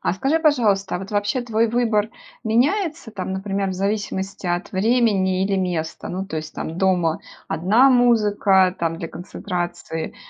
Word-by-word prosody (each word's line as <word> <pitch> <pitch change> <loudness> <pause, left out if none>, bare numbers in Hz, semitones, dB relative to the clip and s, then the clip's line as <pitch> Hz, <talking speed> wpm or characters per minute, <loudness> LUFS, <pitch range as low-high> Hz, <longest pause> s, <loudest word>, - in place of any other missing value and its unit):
А - - 0
скажи, 270 +12 +1
пожалуйста, 225 - +2
а 180 - -1
вот 195 +2 -8
вообще 205 +4 0
твой 230 -1 +1
выбор 225 -3 +1 0.4
меняется 295 - 0
там, 190 -2 -5
например, 195 0 -2
в - - -2
зависимости 195 0 -3
от 175 +2 -2
времени 195 -3 +2
или 195 0 0
места? 175 -4 -3
Ну 190 +2 -3
то 175 -5 -6
есть 155 0 -6
там 165 +2 -5
дома- 180 -4 +2 0.3
одна 205 +12 +4
музыка 205 -6 +3
там 165 -1 -1
для 165 - -5
концентрации, 175 -2 -5
195 Hz, 155 wpm, -22 LUFS, 180-225 Hz, 0.4 s, одна